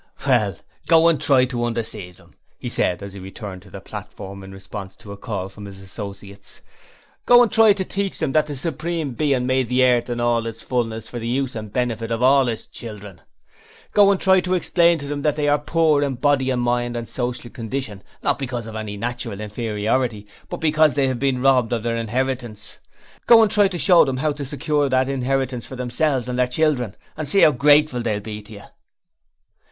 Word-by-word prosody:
'Well, 115 -8 +2 0.3
go 165 0 +6
and 155 -4 0
try 135 -3 +4
to 125 -2 -3
undeceive 110 -6 -4
them,' - - -19 0.2
he - - -5
said, 90 +2 0
as 100 -1 -8
he 100 - -9
returned 95 0 -8
to 100 - -16
the 100 - -9
platform 100 -2 -9
in 95 - -10
response 95 0 -9
to 105 -1 -12
a - - -6
call 100 -3 -5
from 100 +1 -11
his 95 -1 -11
associates. 100 0 -10 0.7
'Go 245 0 +8
and 235 - 0
try 220 -2 +6
to 190 -2 -3
teach 195 0 -3
them 155 -5 -1
that 155 +2 +2
the 145 - -5
Supreme 160 +1 -3
Being 130 0 0
made 130 -2 +1
the 125 +1 +3
earth 125 -1 +3
and 120 0 -3
all 120 -1 +1
its 115 0 -7
fullness 115 -3 -2
for 120 - -6
the 115 - -5
use 130 +1 -1
and 110 -2 -6
benefit 115 -2 -2
of 115 +1 -1
all 135 0 +5
His 115 -2 -3
children. 105 -5 -9 0.7
Go 205 -1 +5
and 195 -2 +2
try 190 -1 +4
to 185 0 0
explain 170 -1 +3
to 145 - -7
them 145 0 -3
that 150 0 +1
they 150 -1 -1
are 145 0 +3
poor 155 -1 +2
in 140 -2 -1
body 135 0 +1
and 125 -2 0
mind 120 0 0
and 115 -1 -5
social 120 -1 -4
condition, 115 -3 -5 0.2
not - - +1
because 120 -4 -4
of 110 -1 -8
any 105 -2 -5
natural 120 -2 -4
inferiority, 105 +1 -2 0.2
but - - -4
because 155 -1 +3
they 135 -2 +2
have 130 -2 -3
been 130 -2 0
robbed 130 -4 +3
of 115 -2 -2
their 115 0 -1
inheritance. 120 -2 -3 0.5
Go 230 -1 +8
and 210 - +1
try 205 -1 +4
to 185 -2 -5
show 170 +3 +6
them 135 -2 -2
how 150 +3 0
to 145 -1 -5
secure 145 +1 -1
that 130 0 +2
inheritance 130 -2 -2
for 130 - -8
themselves 125 +1 -1
and 125 0 -3
their 125 - +3
children 125 -5 0 0.2
and 155 -1 -4
see 200 - +4
how 155 - +7
grateful 145 -1 +4
they'll 110 -3 -1
be 105 0 -7
to 105 +1 -13
you.' 100 0 -11
125 Hz, 215 wpm, -21 LUFS, 110-145 Hz, 0.7 s, Go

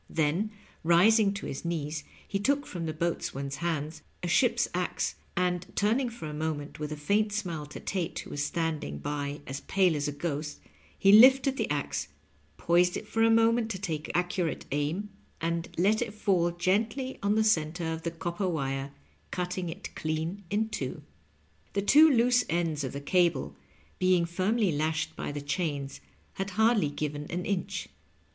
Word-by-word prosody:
Then, 165 +7 +1 0.3
rising 195 +6 +5
to 200 - -5
his 135 - -5
knees, 155 -3 -3 0.2
he 200 - -1
took 280 +7 +1
from 170 -3 -5
the - - -1
boatswain's 140 -4 -2
hands 155 -2 -2 0.2
a - - -1
ship's 235 +6 +3
axe, 180 0 -1 0.2
and, 180 -1 +1
turning 235 +5 +2
for 230 -8 -8
a 150 - -5
moment 150 -1 -3
with 150 0 -4
a 150 - -4
faint 205 +8 +1
smile 175 -8 -3
to - - -8
Tate, 185 -4 -3
who - - -6
was 145 - -2
standing 155 - -2
by 145 - -4
as 135 +1 -5
pale 185 -2 +2
as 145 0 -1
a - - -1
ghost, 150 0 -4 0.4
he 195 - +5
lifted 260 +5 +7
the - - -1
axe, 75 - -2 0.5
poised 175 +1 +3
it 210 - -8
for 225 - -1
a 225 - +6
moment 225 0 +4
to 190 -4 -4
take 160 -6 -3
accurate 175 -1 -1
aim, 150 +9 -1 0.3
and 170 0 -2
let 205 +6 +3
it 225 -3 -3
fall 185 -5 +2
gently 215 +9 0
on 200 +1 +2
the 220 - +3
center 165 -4 +1
of 160 - -5
the 170 - -2
copper 175 +3 -3
wire, 135 -3 -2 0.4
cutting 180 0 -3
it 165 - -7
clean 160 +5 -3
in 215 +2 +1
two. 145 -5 -4 0.7
The 200 - 0
two 300 +9 +7
loose 245 -1 +4
ends 165 -3 0
of 130 - -4
the 140 - -5
cable, 155 - +1 0.4
being 185 -2 +3
firmly 190 +4 +1
lashed 155 +1 -1
by - - -4
the 145 0 -5
chains, 145 -2 -3 0.3
had 195 +1 -3
hardly 220 -7 +4
given 150 0 -4
an 175 +1 -3
inch. 195 -3 -2
170 Hz, 175 wpm, -29 LUFS, 150-205 Hz, 0.7 s, lifted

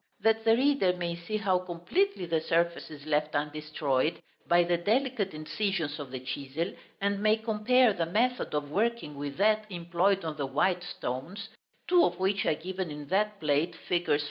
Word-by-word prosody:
that 225 0 +3
the 225 - +6
reader 270 -9 +3
may 170 -1 -2
see 170 +5 -4
how 195 -4 +2
completely 185 - -1
the 165 -2 0
surface 170 +1 0
is 150 -2 -11
left 150 0 0
undestroyed 150 0 -1 0.3
by 175 0 +5
the 175 0 +1
delicate 220 +2 0
incisions 155 -1 -2
of 140 -3 -6
the 130 - -4
chisel, 140 +7 -4 0.3
and 200 0 0
may 215 +1 +4
compare 225 +2 +3
the 170 -3 -1
method 240 +6 0
of 145 -1 -2
working 220 -5 -1
with 140 0 -5
that 215 +2 +3
employed 175 +2 0
on 155 -1 -3
the 140 - -1
white 180 +6 +1
stones, 180 - -5 0.4
two 355 -1 +5
of 175 - +1
which 190 +1 +1
are - - +3
given 185 +2 -4
in 150 0 -7
that 210 +2 +1
plate, 150 +2 +1
figs. 175 -4 +2
175 Hz, 175 wpm, -29 LUFS, 155-210 Hz, 0.4 s, the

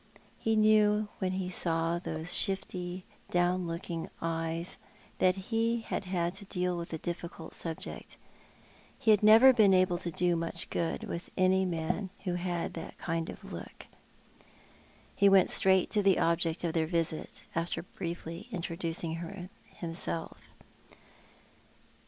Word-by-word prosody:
He 225 0 +1
knew 215 -1 +4
when 185 -1 0
he 185 -1 -2
saw 165 -1 0
those 165 0 -4
shifty, 185 -1 -2 0.2
down 175 0 +1
looking 165 0 -4
eyes 165 +1 -2 0.4
that 185 0 +4
he 225 +4 0
had - - -3 0.3
to 200 - -7
deal 180 -2 -1
with 170 -1 -5
a 160 - -2
difficult 170 0 -6
subject. 165 -2 -6 0.8
He 220 - +3
had 210 - +5
never 225 +5 +8
been 210 -5 +6
able 185 -1 +3
to 175 - -3
do 175 +1 +1
much 165 0 -3
good 165 -1 -1
with 170 - -5
any 185 0 +4
man 175 +3 -2
who 180 -3 -1
had 175 -1 -2
that 165 - -7
kind 165 -1 -2
of - - -9
look. - - -9 1.3
He 200 -1 +5
went 195 -2 +5
straight 190 -1 +4
to 210 - +3
the 195 -2 +4
object 165 0 +1
of 165 -2 0
their 160 -1 +1
visit, 165 -2 -2
after 170 0 -2
briefly 170 +2 -6
introducing 170 0 -4 0.3
himself. 165 -1 -5
175 Hz, 135 wpm, -31 LUFS, 165-190 Hz, 1.3 s, never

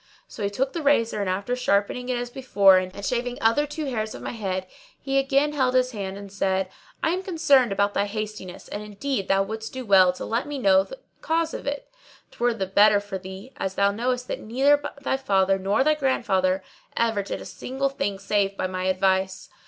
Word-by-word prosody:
So - - -10
he 200 - 0
took 265 +6 -2
the 335 - -3
razor 230 -7 +2
and, 195 - -1
after 200 +6 -1
sharpening 245 +1 0
it 250 - 0
as 245 0 -4
before 200 -8 +5
and 185 +2 -6
shaving 245 0 -1
other 230 +7 +2
two 305 +1 -5
hairs 220 -5 -3
of - - -9
my - - -3
head, 190 -5 -3 0.3
he 275 0 0
again 275 +2 +2
held 260 -3 +1
his 255 0 +3
hand 195 -4 -5
and 200 -1 -10
said, 190 -1 0 0.3
"I 320 - +3
am 365 +2 -1
concerned 300 - +3
about 200 +1 +1
thy 200 - +1
hastiness 215 -3 -6
and 205 - -5
indeed 210 +1 -3
thou 195 0 +3
wouldst 220 +2 -6
do 260 -1 -5
well 190 -3 +6
to - - -7
let 230 +4 -1
me 290 - -4
into 195 -7 +3
the - - -9 0.2
cause 325 0 0
of - - -6
it; 285 0 -3 0.4
't - - -20
were 240 0 +3
the 195 - -2
better 205 +2 +5
for 200 -1 -6
thee, 190 +7 -10
as 190 0 -3
thou 200 0 +3
knowest 250 +3 -2
that - - -4
neither 275 +6 +2 0.2
thy 265 - 0
father 195 -6 +2
nor 200 +6 +2
thy 305 +2 +4
grandfather 195 -10 +1 0.3
ever 225 -3 +1
did 200 - -5
a - - -9
single 270 +2 -3
thing 205 -7 -2
save 195 0 0
by - - -1
my 185 0 -3
advice." 190 0 0
215 Hz, 215 wpm, -25 LUFS, 195-260 Hz, 0.4 s, well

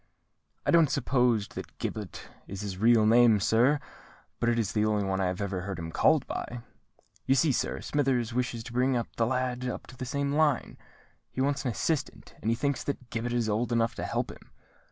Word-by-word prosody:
"I - - +2
don't 165 -4 +5
suppose 125 -5 +1
that - - -9
Gibbet 105 -4 -5 0.2
is 100 0 -6
his 95 -3 -5
real 115 0 +5
name, 115 -1 +6
sir, 120 +8 +3 0.6
but 120 - +2
it 120 - +1
is 110 -3 0
the 105 -1 +1
only 105 -1 +1
one 95 0 -1
I 95 - +1
ever 95 0 -2
heard 95 -1 -5
him 80 -1 -6
called - - +3
by. 120 0 -5 0.7
You 135 - +4
see, 150 +2 +3
sir, - - -1
Smithers 130 -5 0
wishes 120 -2 -2
to 115 - -9
bring 130 +2 +2 0.2
the 115 - +2
lad 125 0 -1
up - - -5
to 130 - -13
the 130 - -5
same 140 +2 -1
line: 150 -4 +1 0.5
he - - -7
wants 140 +1 0
an - - +1
assistant, 145 +5 -2
and 110 - -1
he 115 - +2
thinks 140 +3 -1
that 130 -4 -5
Gibbet 120 +1 -2
is 120 -2 0
old 110 +3 0
enough 115 -1 +1
to - - -6
help - - -2
him. - - -15
120 Hz, 205 wpm, -28 LUFS, 110-130 Hz, 0.7 s, name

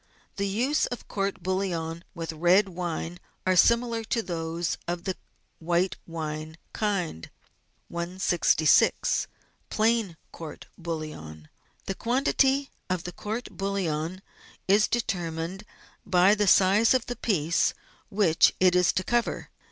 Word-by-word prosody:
The 200 0 0
uses 250 +10 +1
of 245 - -7
court 195 -1 -2
bouillon 175 -3 -2
with 165 -1 -4
red 180 +5 +4
wine 175 -1 -4 0.3
are 185 0 +3
similar 235 +3 +3
to 230 +1 -1
those 165 -1 -3
of 175 0 -3
the 190 - -2 0.4
white 175 +3 +1
wine 155 -1 -5 0.2
kind. 180 - -2 0.6
166— 170 -2 +2 0.4
PLAIN 220 -5 +1
COURT 160 -2 -9
BOUILLON 155 - -7 0.4
The 195 - -2
quantity 270 +4 +1 0.2
of 180 -2 -1
court 220 +4 -4
bouillon 185 -2 -2 0.4
is 205 +3 +5
determined 175 -3 -3 0.4
by 185 0 +4
the 210 -1 +1
size 200 +6 +5
of 255 - +1
the 245 - -4
piece 170 -9 +1 0.3
which 195 -5 +3
it 180 -1 +4
is 180 -1 +4
to 185 - 0
cover. 240 +2 -1
185 Hz, 120 wpm, -27 LUFS, 165-210 Hz, 0.6 s, is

